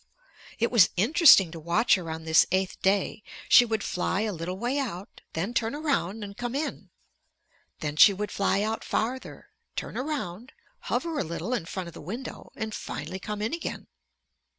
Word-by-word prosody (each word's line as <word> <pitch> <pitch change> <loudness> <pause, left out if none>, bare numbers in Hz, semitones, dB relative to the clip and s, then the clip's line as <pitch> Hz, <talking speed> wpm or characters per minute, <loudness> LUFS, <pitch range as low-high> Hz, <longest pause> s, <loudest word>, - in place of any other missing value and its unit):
It 235 - 0
was 225 -7 +6
interesting 215 - +6
to 165 - -8
watch 170 +9 +2
her 180 -5 0
on 160 0 -5
this 160 0 +5
eighth 190 0 -1
day. 195 +2 +1 0.3
She 245 - +8
would 220 -2 -2
fly 185 +2 -1
a 215 -1 -1
little 175 +2 -5
way 245 +7 -1
out, 200 -8 -6
then 185 +9 -2
turn 230 +2 0
around 225 - -1
and 200 -1 -8
come 245 +3 -4
in. 305 +2 -4 0.9
Then 150 -1 -3
she 205 - +9
would 205 +2 -4
fly 200 0 +1
out 220 +1 -2
farther, 245 +4 -3 0.3
turn - - -5
around, 255 - -4 0.4
hover 330 -3 -1
a - - +1
little 170 +7 -4
in 185 -10 -2
front 185 -1 -5
of 170 - -10
the - - -10
window, 225 - -7
and 220 -1 -4
finally 190 - -5
come 210 +2 -5
in 225 - -1
again. 335 - -4
210 Hz, 180 wpm, -27 LUFS, 180-240 Hz, 0.9 s, she